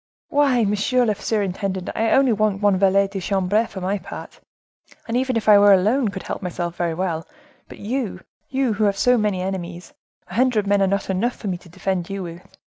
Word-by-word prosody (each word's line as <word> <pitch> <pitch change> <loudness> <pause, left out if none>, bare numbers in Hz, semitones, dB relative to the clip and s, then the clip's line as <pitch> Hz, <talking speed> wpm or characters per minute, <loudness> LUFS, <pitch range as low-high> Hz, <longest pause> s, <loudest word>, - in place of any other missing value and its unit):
"Why, 275 -5 +3
monsieur 210 +5 +1
the 215 - +2
superintendent, 195 -3 -2
I 225 0 0
only 265 -1 +4
want 210 -2 +1
one 205 -2 +4
valet 195 +1 +3
de 195 0 -5
chambre, 200 +4 +1
for 190 - -8
my 195 +2 -1
part, - - -10 0.7
and 230 - -2
even 255 -1 +1
if 220 - -3
I 210 -1 +8
were 205 0 +7
alone, 215 +7 +3
could 195 -2 -5
help - - -5
myself 175 -2 -4
very 170 -2 -1
well; 165 -2 -2 0.4
but - - -11
you, 215 -3 -3 0.3
you 265 -3 0
who 210 +1 +1
have 200 -1 +1
so 250 +4 +4
many 210 -5 0
enemies—a 180 -1 -8
hundred 235 -2 +2
men 200 0 +2
are 195 - +3
not 200 0 -1
enough 225 +7 0
for 205 - -5
me 180 - -2
to 175 - -17
defend 180 +1 -3
you 195 -1 -4
with. 170 0 -11
200 Hz, 205 wpm, -22 LUFS, 185-225 Hz, 0.7 s, I